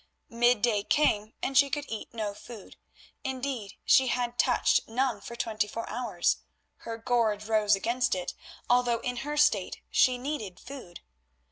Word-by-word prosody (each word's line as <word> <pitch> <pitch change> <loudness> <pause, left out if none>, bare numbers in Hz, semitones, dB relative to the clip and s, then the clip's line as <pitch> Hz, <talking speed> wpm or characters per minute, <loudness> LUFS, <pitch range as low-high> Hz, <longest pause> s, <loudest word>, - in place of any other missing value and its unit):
Midday 235 -2 +3
came 215 -8 +2
and 270 - -2
she 280 +1 +6
could 290 +1 -2
eat 220 - -6
no 215 -3 -3
food; 215 0 -12 0.5
indeed, 260 -6 -4
she 265 -1 +5
had 245 -1 -1
touched - - +3
none 240 -2 -1
for 235 +4 -8
twenty 215 -3 -1
four 230 +2 -5
hours; 210 -9 0 0.4
her 230 0 -6
gorge 225 -3 0
rose 215 -1 +3
against 235 +3 0
it, 180 -1 -4 0.3
although 245 -1 +2
in 245 0 -3
her 295 +4 -4
state 295 -11 +2
she 255 -1 +4
needed 245 -9 -5
food. 250 -11 -10
235 Hz, 150 wpm, -28 LUFS, 210-255 Hz, 0.5 s, she